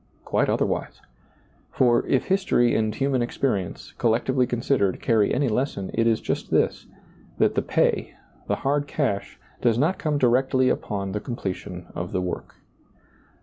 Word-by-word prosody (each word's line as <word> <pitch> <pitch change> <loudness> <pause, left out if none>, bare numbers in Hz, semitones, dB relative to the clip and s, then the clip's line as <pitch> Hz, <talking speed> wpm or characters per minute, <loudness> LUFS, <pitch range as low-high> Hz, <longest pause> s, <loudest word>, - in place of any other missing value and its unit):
Quite - - +1
otherwise. - - -1 0.7
For, 120 -2 +3
if 135 - +2
history 185 -11 +2
and 110 -1 0
human 135 -2 +1
experience, 105 -7 -2
collectively 125 +3 +2
considered, 120 -5 0
carry 110 -3 +2
any 140 +2 +1
lesson, 110 -5 -1
it 115 0 +2
is 115 -1 +3
just - - -3
this; - - +1 0.5
That - - +3
the - - +1
pay, - - 0 0.3
the - - +1
hard 145 +1 +1
cash, 135 -10 -2 0.2
does 115 -2 +3
not 160 +9 +1
come 150 -3 0
directly 130 0 +3
upon 100 -5 -2
the 105 - -2
completion 95 -6 -5
of 85 +1 -5
the 90 - 0
work. 90 -1 -5
120 Hz, 150 wpm, -24 LUFS, 105-135 Hz, 0.7 s, For